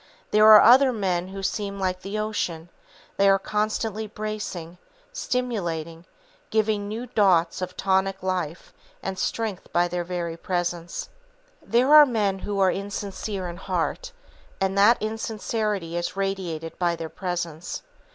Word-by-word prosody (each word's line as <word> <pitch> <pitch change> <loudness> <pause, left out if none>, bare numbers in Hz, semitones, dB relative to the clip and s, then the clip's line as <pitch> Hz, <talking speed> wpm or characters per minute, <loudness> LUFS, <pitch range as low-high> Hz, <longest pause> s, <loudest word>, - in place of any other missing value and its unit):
There 215 0 +6
are 215 -1 +10
other 260 +3 +7
men 185 -6 -1
who 195 +1 -7
seem 200 +1 -2
like 185 -1 -1
the 200 +3 -4
ocean; 180 -6 -3 0.5
they 200 0 +5
are 195 - +5
constantly 215 +1 -2
bracing, 210 -5 -6 0.3
stimulating, 175 - -3 0.4
giving 215 -2 +1
new 225 +4 -4
draughts 185 -8 +2
of 180 0 -5
tonic 190 0 +1
life 180 -3 -3 0.3
and 190 -1 -4
strength 220 -1 -3
by 175 0 +3
their 175 0 -2
very 170 -1 -4
presence. 175 -1 -3 0.5
There 255 +5 +3
are 300 -1 +10
men 205 -5 0
who 200 +1 -3
are 190 -1 +4
insincere 200 -1 -4
in 170 0 -7
heart, 190 - -2 0.5
and 195 0 0
that 205 +4 +5
insincerity 215 -4 -2
is 175 +2 -2
radiated 180 -5 -3
by 175 -1 +1
their 165 -1 -5
presence. 175 -2 -4
195 Hz, 140 wpm, -25 LUFS, 175-215 Hz, 0.5 s, are